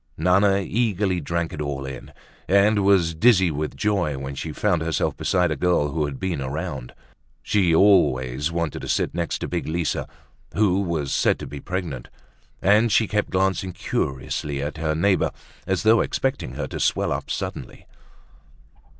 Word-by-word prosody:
Nana 95 Hz, +4 st, +3 dB
eagerly 100 Hz, -3 st, 0 dB
drank 85 Hz, +2 st, -2 dB
it 75 Hz, -, -5 dB
all 70 Hz, -2 st, -3 dB
in 65 Hz, -1 st, -8 dB, 0.4 s
and 100 Hz, +2 st, +4 dB
was 95 Hz, -4 st, +3 dB
dizzy 95 Hz, 0 st, +4 dB
with 75 Hz, +1 st, -3 dB
joy 95 Hz, -9 st, 0 dB
when 70 Hz, +1 st, -5 dB
she 75 Hz, +3 st, -5 dB
found 90 Hz, 0 st, 0 dB
herself 80 Hz, 0 st, -1 dB
beside 90 Hz, -3 st, +1 dB
a -, -, 0 dB
girl 90 Hz, -5 st, +1 dB
who 75 Hz, 0 st, 0 dB
had 70 Hz, -2 st, -6 dB
been 90 Hz, -6 st, -2 dB
around. 70 Hz, -2 st, -5 dB, 0.5 s
She 90 Hz, -6 st, +2 dB
always 75 Hz, -7 st, +3 dB
wanted 85 Hz, -2 st, -2 dB
to -, -, -6 dB
sit -, -, 0 dB
next 85 Hz, -1 st, -2 dB
to -, -, -4 dB
big -, -, -3 dB
Lisa, 80 Hz, 0 st, -1 dB, 0.5 s
who 100 Hz, -2 st, +3 dB
was 80 Hz, -7 st, -2 dB
said -, -, +2 dB
to -, -, -7 dB
be 70 Hz, +2 st, -8 dB
pregnant, 85 Hz, -8 st, -4 dB, 0.6 s
and 105 Hz, +4 st, +4 dB
she 110 Hz, +1 st, +3 dB
kept 105 Hz, +1 st, -1 dB
glancing 95 Hz, 0 st, 0 dB
curiously 70 Hz, +1 st, -3 dB
at 75 Hz, +3 st, -4 dB
her 80 Hz, -1 st, -1 dB
neighbor 95 Hz, +4 st, +2 dB, 0.4 s
as 95 Hz, -1 st, 0 dB
though 110 Hz, +1 st, +5 dB
expecting 135 Hz, -, -2 dB
her -, -, -3 dB
to -, -, -5 dB
swell -, -, +1 dB
up -, -, -3 dB
suddenly. -, -, -5 dB
85 Hz, 165 wpm, -23 LUFS, 75-95 Hz, 0.6 s, though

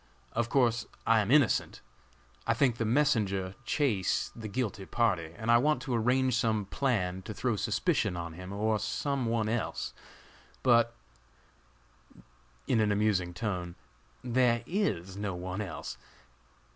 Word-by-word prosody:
Of 115 Hz, 0 st, -1 dB
course, 120 Hz, -3 st, +2 dB, 0.2 s
I 115 Hz, -1 st, +5 dB
am 105 Hz, -1 st, 0 dB
innocent! 140 Hz, -2 st, +3 dB, 0.7 s
I 115 Hz, -, +3 dB
think 125 Hz, -3 st, +2 dB
the 115 Hz, -, -1 dB
messenger, 110 Hz, -8 st, +1 dB
Chase, 115 Hz, -11 st, 0 dB
the 110 Hz, -2 st, -6 dB
guilty 105 Hz, -4 st, -3 dB
party, 90 Hz, -9 st, 0 dB
and 110 Hz, +1 st, 0 dB
I 120 Hz, -, +7 dB
want 150 Hz, +4 st, +2 dB
to 130 Hz, -, -3 dB
arrange 125 Hz, +2 st, +2 dB
some 110 Hz, -3 st, +1 dB
plan 95 Hz, -6 st, -1 dB
to 105 Hz, +3 st, -7 dB
throw 120 Hz, 0 st, 0 dB
suspicion 105 Hz, -, 0 dB
on 85 Hz, -1 st, -5 dB
him 90 Hz, +3 st, -8 dB
or 105 Hz, +2 st, 0 dB
some 140 Hz, 0 st, -1 dB
one 115 Hz, -1 st, 0 dB
else; 115 Hz, +1 st, -2 dB, 0.7 s
but 120 Hz, -2 st, +4 dB, 1.7 s
(in 115 Hz, -, +2 dB
an 105 Hz, -1 st, +3 dB
amusing 100 Hz, -4 st, +1 dB
tone) 90 Hz, -5 st, -3 dB, 0.5 s
there 120 Hz, -1 st, +2 dB
is 100 Hz, -, -1 dB
no 100 Hz, -2 st, -3 dB
one 90 Hz, +3 st, -4 dB
else. 80 Hz, -, -6 dB
110 Hz, 140 wpm, -30 LUFS, 95-120 Hz, 1.7 s, I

